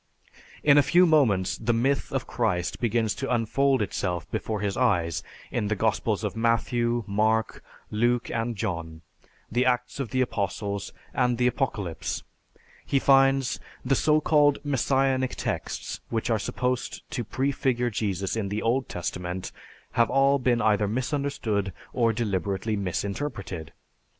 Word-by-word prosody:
In 145 -1 +7
a - - +7
few 175 +5 +5
moments 125 - +3
the 120 +1 +1
myth 135 +4 +1
of 135 -1 -1
Christ 95 -8 -1
begins 115 -2 +1
to 135 +3 -4
unfold 130 +2 +2
itself 90 -3 -2
before 110 -2 -2
his 100 -2 -1
eyes 90 - +1 0.3
in 105 - -1
the 110 - 0
Gospels 110 0 0
of 105 - -2
Matthew, 120 +1 +1
Mark, 110 +2 0 0.3
Luke, 120 +3 +1
and 115 0 -1
John, 85 -5 -4 0.5
the 120 +3 +2
Acts 125 +1 0
of 135 -5 -2
the 130 0 +1
Apostles, 100 -4 -2 0.2
and 125 -1 +2
the 125 - +2
Apocalypse. 110 - -2 0.6
He 140 - 0
finds, 135 -1 +4 0.3
"The 130 - +2
so 150 +3 +3
called 145 -2 +4
Messianic 135 -1 +1
texts - - -4
which 115 0 -1
are 110 - +2
supposed 125 +4 -2
to 120 - -2
prefigure 125 0 0
Jesus 100 -3 -1
in 105 -3 -2
the 105 +2 -2
Old 125 +4 +1
Testament 90 +1 -4 0.4
have 115 -1 +3
all 140 +1 +4
been 120 -3 +2
either 105 -1 +3
misunderstood 120 - -1 0.2
or 115 -2 +3
deliberately 100 -1 -1
misinterpreted. 100 - -3
115 Hz, 140 wpm, -26 LUFS, 100-130 Hz, 0.6 s, In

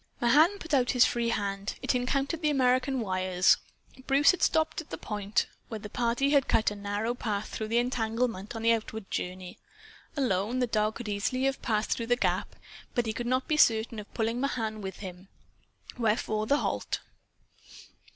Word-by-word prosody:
Mahan 305 +11 +5
put 335 -4 -7
out 255 -3 +3
his 250 -1 +6
free 235 -1 0
hand. 200 -2 -2
It - - +1
encountered 275 +6 -1
the 305 - +2
American 255 -1 +2
wires. 185 -2 +3 0.5
Bruce 280 +1 +6
had 365 - -5
stopped 315 0 +2
at 315 - -16
the - - -5
spot 205 -1 -1 0.2
where 225 - -5
the 210 0 -9
party 240 +4 +1
had 280 -3 +4
cut 220 -1 +2
a - - -5
narrow 205 +3 -2
path 215 -4 -3
through 220 - -4
the 230 +2 +1
entanglement 230 -3 -1
on 225 - -5
the 230 - +5
outward 220 -2 -2
journey. 180 0 -5 0.6
Alone, 230 -2 0
the 255 - +2
dog 215 -2 0
could 240 - -6
easily 210 +5 -1
have 270 0 0
passed 215 -2 0
through 230 - -1
the 245 - +3
gap, - - -1 0.4
but 240 - +1
he 220 - -2
could 240 +1 -4
not 255 +1 0
be 305 - +1
certain 225 -4 +3
of 210 - -10
pulling 230 +2 0
Mahan 225 -6 -2
with 190 -1 -7
him. 185 -1 -8 0.7
Wherefore 215 -1 0
the 285 - +4
halt. - - -2
230 Hz, 185 wpm, -29 LUFS, 210-255 Hz, 0.7 s, his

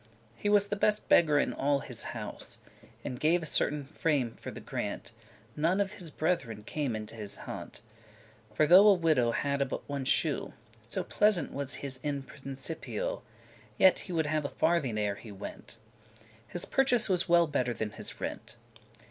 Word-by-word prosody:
He 205 - -2
was 205 -1 +4
the 205 - 0
beste 210 +1 +1
beggar 155 -3 +5
in - - +1
all 140 0 +1
his - - -2
house: - - -5 0.5
And 125 - -4
gave 170 +2 +3
a - - -4
certain 150 0 +1
farme 140 -5 0
for - - -8
the - - -8
grant, 105 +3 -5 0.4
<19> 115 - -28
None 175 +5 +3
of 200 -1 0
his 180 -5 -7
bretheren 135 - -2
came 140 -5 -2
in 110 0 -4
his 105 -2 -4
haunt. - - -7 0.7
For 110 +8 +3
though 185 +6 +8
a 205 - +8
widow 155 -9 +2
hadde 140 +2 0
but - - -5
one 140 -2 -3
shoe, - - +1 0.3
So - - -2
pleasant 205 -7 +2
was 140 -2 -3
his 130 -2 -4
In 140 0 -3
Principio,<20> 140 - -4 0.6
Yet 190 - +5
would 165 -3 0
he 150 - -2
have 155 -1 +1
a 140 - -2
farthing 145 -10 +1
ere 105 -1 -1
he 110 - -11
went; 100 +3 -9 0.7
His 175 - -2
purchase 265 -4 +3
was 180 -3 +1
well 170 0 +6
better 125 -5 0
than 110 -1 -3
his - - -7
rent. - - -6
150 Hz, 180 wpm, -30 LUFS, 130-175 Hz, 0.7 s, though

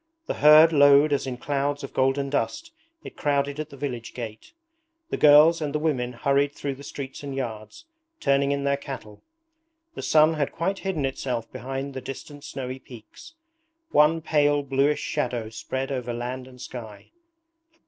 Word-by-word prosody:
The - - -2
herd 155 +2 +7
lowed 145 0 +6
as 140 - -1
in 125 -1 -4
clouds 145 +2 -2
of 140 - -7
golden 135 +1 +1
dust 325 - -2 0.3
it - - -10
crowded 140 0 0
at 155 0 -4
the 140 - -12
village 125 -4 -5
gate. 110 - -8 0.6
The - - -1
girls 150 +3 +7
and 150 -1 -3
the - - +3
women 130 -6 -1
hurried 140 +3 +1
through 140 -1 -4
the 135 +1 -12
streets 140 -1 -7
and 140 -2 -6
yards, 120 - -6 0.3
turning 140 - +2
in 140 0 -1
their 140 0 +1
cattle. 135 -7 -9 0.7
The - - -7
sun 155 +1 +4
had 150 -3 -1
quite 190 +4 -2
hidden 180 -8 -2
itself 125 -3 -3
behind 135 +3 -5
the 130 - -5
distant 145 +2 -9
snowy 130 0 -6
peaks. 130 - -14 0.6
One 155 +2 +4
pale 145 -2 +2
bluish 140 +2 +1
shadow 120 -3 -2
spread 130 +4 -4
over 125 -2 -3
land 125 +2 -5
and 125 -1 -15
sky. 110 -5 -9
140 Hz, 170 wpm, -25 LUFS, 130-150 Hz, 0.7 s, herd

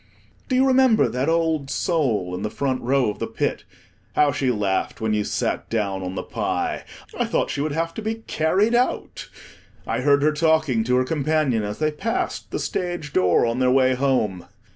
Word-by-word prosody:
Do 255 - +1
you 260 +1 +4
remember 260 -4 +4
that 130 +4 -1
old 160 -4 0
soul 120 - 0
in 90 - -4
the 105 - -2
front 130 0 -2
row 130 -2 +2
of - - -11
the - - -2
Pit? - - -2 0.5
How 145 -1 +4
she 130 -1 0
laughed 105 -5 -1
when 110 -1 0
you 105 -1 +1
sat - - -2
down 100 -4 -1
on 90 0 -5
the - - -3
pie! - - -2 0.3
I - - +2
thought - - 0
she 140 - -2
would 155 +1 -1
have 165 +1 -2
to 220 - -6
be 220 +1 -2
carried 190 +9 +1
out. 245 +1 -1 0.6
I - - -2
heard 140 +1 +3
her 155 - +4
talking 155 -6 +2
to 125 +1 +2
her 130 - +3
companion 150 -4 0
as 105 0 -4
they 155 0 0
passed 225 +10 -3
the - - -3
stage 175 -5 -3
door 90 +3 +3
on 115 +1 -1
their 130 -1 +3
way 130 0 +4
home. 125 -9 0
140 Hz, 200 wpm, -23 LUFS, 115-160 Hz, 0.6 s, you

